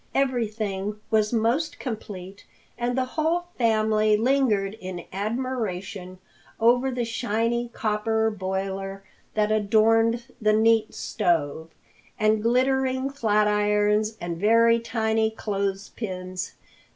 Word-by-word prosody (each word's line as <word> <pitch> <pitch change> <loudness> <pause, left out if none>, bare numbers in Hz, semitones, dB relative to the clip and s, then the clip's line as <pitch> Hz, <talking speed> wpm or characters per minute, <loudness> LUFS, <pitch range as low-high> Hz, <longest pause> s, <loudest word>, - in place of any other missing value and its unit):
Everything 215 -6 -1
was 215 -1 +2
most 240 +7 0
complete 200 -5 -7 0.3
and 245 +1 -2
the 260 - +1
whole 320 +6 0
family 215 -2 +3
lingered 225 -5 +2
in 185 -2 -6
admiration 200 -4 -3 0.4
over 245 +3 +4
the 245 -2 -2
shiny 235 +1 -1
copper 220 0 0
boiler 195 0 -4 0.3
that 215 0 +2
adorned 225 +2 +3 0.2
the 215 0 +3
neat 220 0 +3
stove, 160 -1 -1 0.5
the 215 -1 +3
glittering 260 +3 +1
flatirons 210 -2 +2
and 170 -1 -4
very 230 +2 +5
tiny 225 -1 0
clothes 200 -3 -3
pins. 185 -3 -5
215 Hz, 105 wpm, -25 LUFS, 200-235 Hz, 0.5 s, very